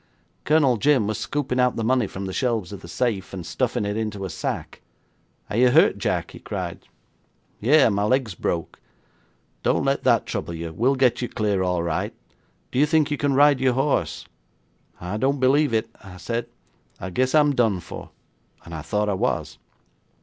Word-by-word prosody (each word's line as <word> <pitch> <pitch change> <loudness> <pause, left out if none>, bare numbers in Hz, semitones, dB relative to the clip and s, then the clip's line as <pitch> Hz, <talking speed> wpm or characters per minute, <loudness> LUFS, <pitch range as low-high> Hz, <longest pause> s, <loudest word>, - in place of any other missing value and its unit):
Colonel 145 -5 +4
Jim 135 -1 +3
was 110 0 -2
scooping 135 -4 -2
out 125 0 +3
the 115 - -2
money 125 -1 +2
from 95 +1 -6
the 95 - -5
shelves 115 -7 -1
of 100 - -8
the - - -11
safe, 95 -1 -2
and 90 -3 -6
stuffing 105 - -1
it 105 0 -2
into 105 -3 -3
a 95 - -5
sack. - - -5 0.7
'"Are 105 - -3
you 125 +1 +5
hurt, 155 - +4
Jack?" - - -1
he - - -11
cried. - - -6 0.7
'"Yes, 135 +2 +5
my 100 0 0
leg's 125 -2 +1
broke." 85 0 -3 0.8
'"Don't - - +1
let - - 0
that - - +3
trouble 85 - -4
you; 85 0 -6
we'll 125 +10 +2
get 125 -2 +2
you 120 - -2
clear 105 -3 0
all 90 -2 0
right. 85 -2 -2 0.6
Do 125 - 0
you 150 - +5
think 155 -1 +2
you 150 - 0
can 140 -2 +1
ride 145 -1 +5
your 130 -1 +3
horse?" 130 - 0 0.7
'"I 90 +4 -4
don't 135 +5 +1
believe 140 +3 +3
it," 110 0 0 0.3
said 115 +4 -3 0.5
I. - - -6
"I - - -4
guess 130 - +1
I'm 150 -1 +5
done 115 -7 +2
for," - - -9 0.6
and 85 - -10
I 80 - -5
thought 105 +7 -1
I 105 - +1
was. 95 - -2
115 Hz, 190 wpm, -23 LUFS, 95-135 Hz, 0.8 s, you